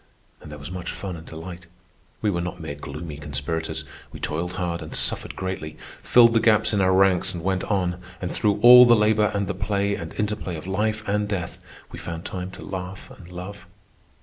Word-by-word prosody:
And - - -11
there 75 - -7
was 75 +4 -8
much 90 -1 -5
fun 95 -3 -5
and 80 -1 -11
delight. 85 +2 -9 0.6
We 105 - +3
were 85 -2 -1
not 90 +1 -5
mere 80 -3 -5
gloomy 75 +2 -7
conspirators. 75 +3 -3 0.3
We - - -9
toiled 85 +4 -3
hard 85 -2 -2
and 80 - -7
suffered - - 0
greatly, 95 -5 -5 0.2
filled 115 -1 +6
the 115 - +4
gaps 110 0 +3
in 100 - +2
our 95 0 +4
ranks 95 -1 +3
and 85 - -6
went 95 0 0
on, 90 -3 -1 0.2
and 90 - -4
through 105 -2 +1
all 125 +1 +11
the 120 -1 +7
labour 105 -1 +3
and 100 0 0
the 100 - -2
play 100 0 0
and 85 -4 -5
interplay 105 -4 -2
of 80 - -8
life 110 +3 -1
and 105 +1 0
death 95 -5 -4 0.3
we - - -8
found 85 +1 -6
time 90 0 -5
to - - -10
laugh 95 0 -6
and 90 -2 -14
love. 90 +2 -8
95 Hz, 205 wpm, -24 LUFS, 85-105 Hz, 0.6 s, all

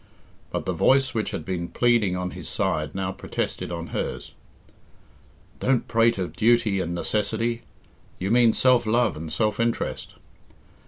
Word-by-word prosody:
But - - -3
the - - -1
voice 135 0 +3
which 110 -2 -1
had - - -5
been 90 -2 -3
pleading 115 -6 +2
on 90 0 -3
his - - -8
side 75 0 -1
now 95 -1 -2
protested 95 - -4
on 85 0 -5
hers. - - -4 1.3
"Don't 130 -2 +1
prate 115 0 +3
of 90 -4 -4
duty 110 -1 +3
and 85 -1 -2
necessity. 115 +5 -1 0.6
You 95 +3 -2
mean 120 -1 +5
self 125 -3 +3
love 120 0 +2
and 80 +1 -7
self 105 -1 0
interest. 115 0 -2
110 Hz, 150 wpm, -25 LUFS, 90-120 Hz, 1.3 s, mean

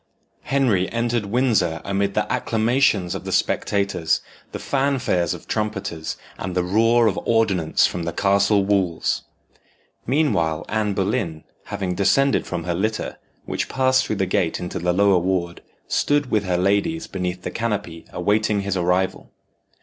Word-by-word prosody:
Henry 120 -10 +1
entered 115 -2 -1
Windsor 105 -8 +1
amid 100 0 -1
the - - +1
acclamations 110 -5 +1
of - - -5
the - - -5
spectators, 100 -5 0 0.3
the - - -4
fanfares 130 - 0
of - - -13
trumpeters, 100 -6 -3 0.2
and 90 -1 -4
the 90 - +2
roar 115 +5 +3
of 105 -3 +1
ordnance 100 -8 +2
from 90 - -2
the 85 0 -2
castle 100 +2 +2
walls. 95 -4 0 0.9
Meanwhile, 85 - +1
Anne 105 -2 -1
Boleyn, 95 -5 -1 0.2
having 95 -2 -3
descended 135 +9 +2
from 85 - -3
her 85 +1 -1
litter, 110 +5 -2 0.3
which - - -3
passed 130 0 +2
through 110 - -1
the 95 - 0
gate 90 -2 0
into 90 - -4
the 90 +1 +1
lower 100 0 +4
ward, 85 -1 -2 0.3
stood 145 -2 +1
with 105 -2 +1
her 90 -1 0
ladies 100 - +1
beneath 90 -1 -4
the - - -4
canopy 105 -7 -3
awaiting 105 0 +1
his 100 -1 -2
arrival. 90 +1 0
100 Hz, 150 wpm, -22 LUFS, 90-115 Hz, 0.9 s, lower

